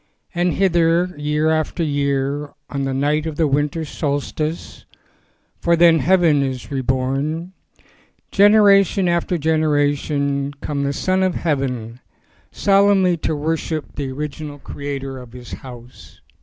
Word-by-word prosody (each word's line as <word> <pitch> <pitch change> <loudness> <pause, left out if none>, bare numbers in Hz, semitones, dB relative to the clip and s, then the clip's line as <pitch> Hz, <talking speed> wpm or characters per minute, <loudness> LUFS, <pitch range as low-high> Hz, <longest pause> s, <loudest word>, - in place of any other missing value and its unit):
And 175 0 +1
hither, 175 -1 +2
year 150 +2 0
after 160 +2 -1
year, 140 0 -1 0.2
on 140 -1 -2
the 135 - -2
night 150 +3 0
of 160 - -4
the 160 - +2
winter 145 +3 0
solstice, 150 +2 -4 0.7
for 170 - +2
then 170 -1 +5
heaven 170 -5 +3
is 130 -1 -4
reborn, 135 +6 -2 0.8
generation 200 -2 +5
after 170 +1 0
generation 145 -2 0
came 140 0 -4
the 140 - 0
Son 185 +6 0
of 185 -2 +1
Heaven 125 -7 -2 0.5
solemnly 195 -2 +3
to 155 0 -2
worship 155 +1 -3
the 140 -2 -4
original 150 +1 -6
creator 135 -1 -6
of 125 -2 -13
his 125 -2 -11
house. 125 -1 -11
150 Hz, 125 wpm, -20 LUFS, 140-170 Hz, 0.8 s, then